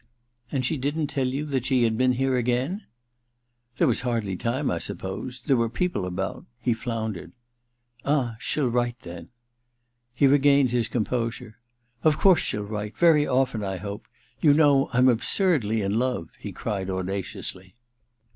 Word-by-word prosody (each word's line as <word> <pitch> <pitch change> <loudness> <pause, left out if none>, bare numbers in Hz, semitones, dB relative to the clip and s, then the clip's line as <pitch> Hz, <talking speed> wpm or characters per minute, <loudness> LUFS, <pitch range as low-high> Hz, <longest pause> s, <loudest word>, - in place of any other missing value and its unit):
* 120 0 -39
And 130 -3 -1
she 155 - 0
didn't 145 +3 -2
tell 135 -3 0
you 135 +4 -2
that 135 -4 -1
she 130 -3 +3
had 115 -1 +2
been 130 +2 +3
here 130 +1 +1
again? 125 - -1 0.5
' 120 0 -44
•There - - +5
was 120 - +2
hardly 115 -6 -1
time, 125 +8 -1
I 85 - -1
suppose 105 +10 -5
— - - -28
^there 135 - +3
were 115 -1 +1
people 120 - -1
about 95 +1 -4
' 120 - -46
he 120 0 +1
floundered. 110 -7 -4 0.4
* 120 - -50 0.2
Ah, 135 -5 0
she'll 145 +1 0
write, 120 0 0
then.' 85 -1 -9 0.9
He 140 - +3
regained 140 -1 +4
his 120 -2 +1
composure. 115 -1 -3 0.4
•Of 155 -2 +4
course 190 -3 +5
she'll 105 - -2
write: 105 0 -5
very 160 -4 +5
often, 125 -4 +1
I 95 -1 -3
hope. 100 +2 -7 0.3
You 145 -3 +5
know 145 -3 +4
I'm 125 +1 +4
absurdly 120 - +2
in 100 +3 0
love,' 125 -10 -2
he - - -6
cried 95 -2 -3
audaciously. 95 0 -4
120 Hz, 175 wpm, -25 LUFS, 105-135 Hz, 0.9 s, There